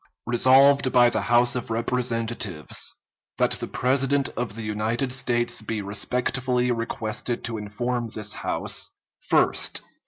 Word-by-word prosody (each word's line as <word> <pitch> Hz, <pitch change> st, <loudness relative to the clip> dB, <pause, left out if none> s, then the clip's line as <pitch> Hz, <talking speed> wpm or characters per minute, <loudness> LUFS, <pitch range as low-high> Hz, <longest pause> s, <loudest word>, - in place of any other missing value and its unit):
Resolved 130 Hz, +3 st, +5 dB
by 120 Hz, -1 st, +5 dB
the -, -, 0 dB
House 120 Hz, +1 st, +3 dB
of 125 Hz, -, -4 dB
Representatives, 115 Hz, -7 st, -1 dB, 0.4 s
That -, -, +2 dB
the -, -, -2 dB
President 135 Hz, +2 st, +1 dB
of 120 Hz, -3 st, -5 dB
the 115 Hz, -, -6 dB
United 110 Hz, +5 st, -1 dB
States 120 Hz, -3 st, 0 dB
be 110 Hz, 0 st, -3 dB
respectfully 125 Hz, +4 st, 0 dB
requested 115 Hz, 0 st, -3 dB
to 115 Hz, -2 st, -4 dB
inform 120 Hz, +3 st, -3 dB
this 105 Hz, -1 st, -2 dB
House: -, -, -1 dB, 0.4 s
_First. -, -, +2 dB
120 Hz, 125 wpm, -24 LUFS, 110-125 Hz, 0.4 s, Resolved